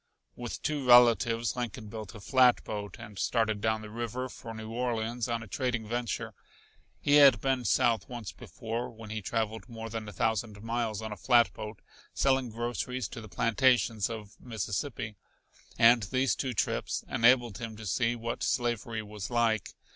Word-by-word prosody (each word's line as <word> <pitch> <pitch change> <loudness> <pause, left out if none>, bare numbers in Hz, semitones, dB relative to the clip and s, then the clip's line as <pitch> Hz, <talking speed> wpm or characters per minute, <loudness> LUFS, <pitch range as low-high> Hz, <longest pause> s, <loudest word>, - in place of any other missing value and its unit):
With 120 -1 -6
two 150 -2 -1
relatives 120 -1 +5
Lincoln 120 -2 -4
built 110 -1 -8
a - - -8
flatboat 110 -4 +2
and 105 -4 -10
started 110 -3 +1
down 110 0 0
the 105 - -8
river 120 +3 -4
for 115 -2 -9
New 110 0 -7
Orleans 120 -1 -2
on 115 -1 -1
a - - -10
trading 120 0 -2
venture. 120 -1 -3 0.7
He 145 0 +4
had 140 -4 +8
been 135 -2 0
south 110 +2 +2
once 120 -5 -6
before, 115 +2 -5
when 110 -2 -11
he 110 0 -3
traveled 110 +3 -2
more 115 -1 -7
than 110 -1 -5
a - - -8
thousand 110 -1 -1
miles 115 -2 -2
on 110 - -5
a - - -4
flatboat 115 -3 +1 0.3
selling 130 -2 +2
groceries 120 +2 -3
to 115 - -8
the 110 - -11
plantations 115 -1 +2
of 110 -2 -8
Mississippi, 110 0 -4 0.6
and 115 +1 +6
these 130 +3 +1
two 130 -3 -3
trips - - -1
enabled 120 -1 +3
him 115 -2 -6
to 110 - -9
see 115 +4 +1
what 115 0 -4
slavery 115 -2 -1
was 105 -3 -7
like. 115 -2 +1
115 Hz, 165 wpm, -30 LUFS, 110-120 Hz, 0.7 s, had